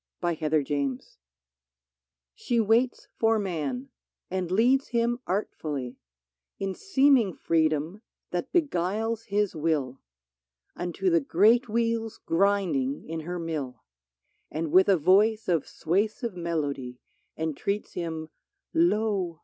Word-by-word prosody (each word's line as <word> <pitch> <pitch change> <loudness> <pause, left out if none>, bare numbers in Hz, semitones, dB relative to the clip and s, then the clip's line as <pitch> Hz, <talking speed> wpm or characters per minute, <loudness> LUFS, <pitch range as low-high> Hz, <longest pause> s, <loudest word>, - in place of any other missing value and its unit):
83 160 -3 -1
PHILISTIA 140 -3 0 1.6
Ohe 225 - +2
waits 235 +4 +2
for 225 0 +3
man, 195 - -3 0.4
and 185 -2 -2
leads 245 +8 +3
him 235 +1 0
artfully 150 - -3 0.3
— 65 0 -61
In 195 -1 -2
seeming 270 - +3
freedom 160 +3 0 0.3
that 175 -1 -3
beguiles 225 - 0
his 205 -2 0
will 150 -5 -1 0.4
— 65 0 -53
Unto 180 +1 -1
the 165 -1 +4
great 220 - +4
wheels 230 0 -1
grinding 200 - +1
in 165 0 -4
her 175 +3 -5
mill; 150 -8 -4 0.7
And 155 0 -3
with 190 +2 +6
a 195 - +5
voice 205 +7 +3
of 165 -5 +1
suasive 210 +7 -1
melody, 145 -7 -3 0.4
Entreats 160 +6 -2
him: 160 -2 -4 0.3
" 395 - -56
Lo 210 - +1
185 Hz, 115 wpm, -27 LUFS, 155-225 Hz, 1.6 s, with